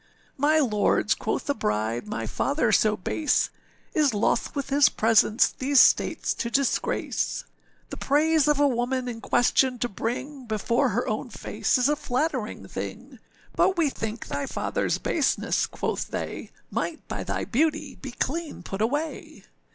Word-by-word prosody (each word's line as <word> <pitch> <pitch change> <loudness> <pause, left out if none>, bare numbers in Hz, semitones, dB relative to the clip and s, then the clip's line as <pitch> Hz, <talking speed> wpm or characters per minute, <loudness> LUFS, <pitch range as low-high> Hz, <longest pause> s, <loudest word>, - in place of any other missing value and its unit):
â 300 +3 +4
âMy 275 -7 +2
lords,â 210 -1 +2
quoth - - -2
the 285 - +1
bride, 110 - -2
âmy 210 - -4
father 275 -6 0
so 215 +1 +3
base 300 - 0 0.4
Is 295 - +2
loth 210 - 0
with 280 -1 -3
his 280 -2 +6
presence 220 0 +4
these 275 +1 +2
states - - +4
to 235 - -3
disgrace.â 275 +2 -2
âThe - - -12
praise 305 +2 +3
of 295 -1 +3
a 290 - +5
woman 250 0 -1
in 230 -2 -5
question 250 +2 +2
to 245 - -1
bring, 250 +6 -4
Before 220 +2 +1
her - - -1
own - - -2
face - - -1
is 250 +1 +3
a 295 - +2
flattering 295 +3 -2
thing; - - -7 0.4
But 380 - +3
we 315 -5 +2
think 225 -1 -5
thy 280 -1 -3
fatherâs - - -1
baseness,â 305 -5 +1
quoth - - -3
they, - - -5 0.2
âMight 320 - -2
by - - -4
thy - - -3
beauty 300 +2 0
be 270 - -9
clean 300 - -3
put 195 +3 -5
away. 290 +6 -3
265 Hz, 160 wpm, -26 LUFS, 225-295 Hz, 0.4 s, his